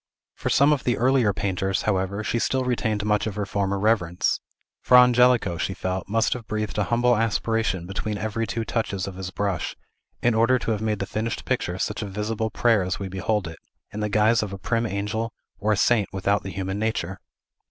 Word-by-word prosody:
For - - -3
some 145 +2 +5
of 140 - -2
the 120 - +1
earlier 125 -3 +3
painters, 95 0 -1
however, 100 0 -1
she 115 - 0
still 130 +2 0
retained 110 -4 -1
much 105 0 +1
of 105 - -4
her 105 -1 -2
former 100 0 -1
reverence. 95 -5 +1 0.4
Fra 125 - +6
Angelico, 125 -7 +4
she 95 - -2
felt, 95 0 -3
must 115 +1 +2
have 120 -3 -8
breathed 110 -1 -2
a 105 - +2
humble 120 +1 +3
aspiration 110 -4 0
between 100 +3 -3
every 110 +3 -2
two 110 +3 -3
touches 100 -5 -2
of 100 - -6
his 95 0 -6
brush, 95 -3 -2 0.5
in 120 - +4
order 115 +3 +4
to 115 - -2
have 105 -1 -1
made 110 -1 0
the 100 - -3
finished 110 +3 -3
picture 95 -8 -1
such - - -2
a 105 - -3
visible 105 +3 -2
prayer 115 -2 +3
as 90 0 -2
we 100 -1 -5
behold 95 +1 -1
it, 80 -1 -9 0.3
in 105 - -6
the 105 0 -1
guise 110 +2 +3
of 105 -2 -4
a 100 - -5
prim 115 +4 -1
angel, 105 +3 -2 0.3
or 105 +1 +1
a 105 - +2
saint 105 -1 +3
without 100 +2 0
the 95 - -6
human 95 +1 -3
nature. 105 -4 -2
105 Hz, 210 wpm, -24 LUFS, 95-115 Hz, 0.5 s, Fra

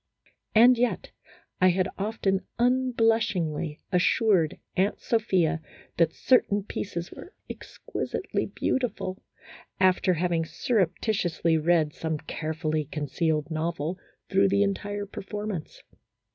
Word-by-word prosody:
And 240 +2 +7
yet 245 -1 0 0.5
I 185 - +7
had 185 +1 +2
often 195 -2 -1
unblushingly 225 -11 +1
assured 180 -2 +3 0.2
Aunt 190 +2 +1
Sophia 180 -8 +1 0.4
that 165 -1 +3
certain 205 -6 +3
pieces 175 -4 -5
were 365 - -12
" - - -44
exquisitely - - -4
beauti 250 -3 -1
ful," 185 +1 -5 0.6
after 185 -1 +3
having 170 0 0
surreptitiously 180 -3 0
read 160 -2 +2
some 160 -1 -3
carefully 155 0 -3
concealed 155 +1 -1
novel 165 +2 -2 0.3
through 195 0 +3
the 200 +1 +3
entire 205 +1 -2
performance. 200 -3 -6
185 Hz, 105 wpm, -27 LUFS, 160-210 Hz, 0.6 s, And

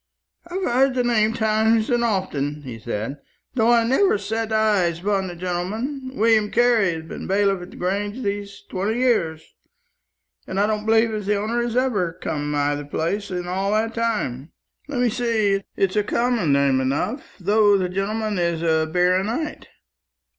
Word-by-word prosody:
"I've 370 +2 -4
heard 260 0 +2
the 250 - +2
name 225 -2 +2
times 220 0 +2
and 240 -1 +2
often," 150 -9 -1
he 120 -4 -7
said, 115 +4 -4 0.4
"though 235 -2 +3
I 235 -1 +5
never 390 - +3
set 225 - -3
eyes 205 -6 +2
upon 195 0 0
the 175 - -7
gentleman. 215 - -4
William 220 -1 +3
Carley 230 -6 +3
has 160 - -6
been 160 - -7
bailiff 195 -1 +2
at 175 - -9
the - - -13
Grange 205 +6 -2
these 200 0 -4
twenty 205 +5 -2
years, 170 -11 0 0.9
and 190 - -2
I 205 - +4
don't 215 0 -2
believe 225 0 +3
as 210 -2 -4
the 210 - +2
owner 220 +4 -1
has 240 -1 -2
ever 210 -10 +1
come 150 -3 -4
nigh 145 0 +1
the 145 0 -4
place 185 +8 -2
in 180 -1 -4
all 195 +3 -1
that 225 +1 0
time. 210 - -2 0.4
Let 275 -4 -2
me 245 - +3
see, 220 -4 +1
it's 195 0 0
a 210 - +4
common 235 - +1
name 140 -1 +3
enough, 145 - -2
though 205 +2 +4
the 185 -1 0
gentleman 205 +2 -2
is 170 -1 0
a 160 -1 +2
baronight. 190 - 0
205 Hz, 175 wpm, -22 LUFS, 175-230 Hz, 0.9 s, I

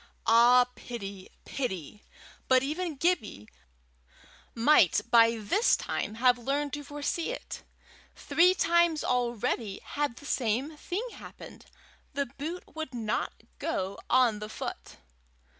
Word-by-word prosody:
Ah, 240 +2 +6
pity! 200 -7 -8 0.2
pity! 205 - -5 0.4
But 260 0 +4
even 315 +3 -3
Gibbie 265 - -1 1.1
might 230 - +5
by 230 -1 +6
this 225 - +2
time 215 - -3
have 245 +1 +3
learned 280 +4 -2
to 290 0 -4
foresee 295 +5 -3
it! - - -6 0.5
three 340 +6 +3
times 340 -3 +2
already 240 -4 -1
had 290 -4 -2
the 285 - -13
same 260 +3 -1
thing 380 +10 -4
happened: - - -12 0.5
the 280 0 0
boot 295 +8 -6
would 315 -5 -6
not 220 -2 -3 0.2
go 195 - -3
on 245 -4 +4
the 210 0 -6
foot. - - -7
255 Hz, 120 wpm, -29 LUFS, 230-305 Hz, 1.1 s, Ah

